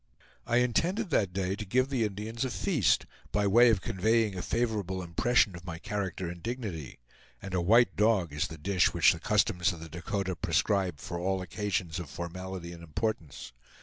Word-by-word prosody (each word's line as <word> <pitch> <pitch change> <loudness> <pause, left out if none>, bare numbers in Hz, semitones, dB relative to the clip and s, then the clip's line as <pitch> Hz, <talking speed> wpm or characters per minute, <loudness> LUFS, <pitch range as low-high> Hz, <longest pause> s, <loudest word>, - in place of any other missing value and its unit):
I 120 0 +2
intended 170 - +1
that 100 -9 +2
day 95 +1 -1
to 110 - -5
give 130 +6 +1
the 125 -5 +1
Indians 105 +4 -4
a 130 - -1
feast, 125 - +1 0.3
by 105 0 +1
way 120 +5 +6
of 105 -5 +2
conveying 110 +2 +1
a 90 - -3
favorable 105 -6 -1
impression 100 +3 +2
of 85 - -10
my 90 -2 -6
character 95 -3 -3
and 85 0 -7
dignity; 105 - -5 0.4
and 95 -1 -8
a 90 - +1
white 115 +7 +4
dog 105 -7 +2
is 75 - 0
the 80 - -9
dish 90 +3 +1
which - - +6
the - - -8
customs 90 +4 +2
of 85 - -10
the 80 0 -9
Dakota 95 +3 -3
prescribe 95 0 +1
for 85 - -5
all 95 +2 0
occasions 90 -2 -2
of 85 -5 -6
formality 90 +2 -6
and 85 -1 -10
importance. 80 - -4
95 Hz, 185 wpm, -29 LUFS, 85-110 Hz, 0.4 s, way